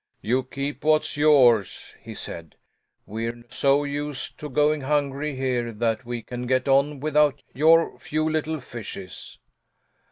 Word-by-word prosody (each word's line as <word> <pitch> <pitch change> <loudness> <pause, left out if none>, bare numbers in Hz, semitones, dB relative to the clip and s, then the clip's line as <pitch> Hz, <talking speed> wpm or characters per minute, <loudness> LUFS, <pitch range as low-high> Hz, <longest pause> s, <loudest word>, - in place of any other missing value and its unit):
"You 125 +4 +1
keep 140 +2 -5
what's 155 0 +2
yours," 130 -9 +3
he - - -9
said. 80 -2 -8 0.5
"We're 115 +2 -5
so 140 +2 +2
used 145 -1 -5
to 150 - -6
going 150 +2 +2
hungry 145 +1 -1
here 125 -3 -1
that 115 +2 -1
we 120 -1 -5
can 125 0 -6
get 130 +1 +1
on 140 +1 +3
without 150 0 +2
your 165 +4 +4
few 155 +1 -1
little 155 0 -1
fishes." 100 -6 -9
140 Hz, 135 wpm, -24 LUFS, 120-150 Hz, 0.5 s, your